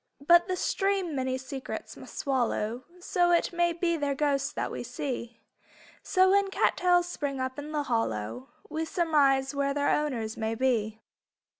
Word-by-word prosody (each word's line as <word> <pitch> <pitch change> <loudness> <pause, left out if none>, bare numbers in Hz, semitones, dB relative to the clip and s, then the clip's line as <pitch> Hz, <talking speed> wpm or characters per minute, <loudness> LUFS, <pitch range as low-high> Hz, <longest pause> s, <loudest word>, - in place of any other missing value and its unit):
But 345 +2 +6
the 370 - -1
stream 390 -3 0
many 260 -1 -1
secrets 260 0 -7
must - - -12
swallow 245 -3 -1
So 355 0 +1
it 345 0 +2
may 345 0 +2
be 340 0 0
their 285 -2 -1
ghosts 280 -2 0
that - - -3
we - - -5
see. 240 -4 -5 0.6
So 375 0 +3
when 400 0 +3
cat - - +2
tails 355 -1 +3
spring 285 -6 -3
up 260 +2 -3
in 295 +1 -7
the 300 -1 -1
hollow 120 - -2 0.2
We 315 +1 -3
surmise 290 -5 +2
where 280 0 0
their 285 0 +1
owners 240 -7 -1
may 220 0 -2
be. 225 -3 0
280 Hz, 165 wpm, -28 LUFS, 255-345 Hz, 0.6 s, But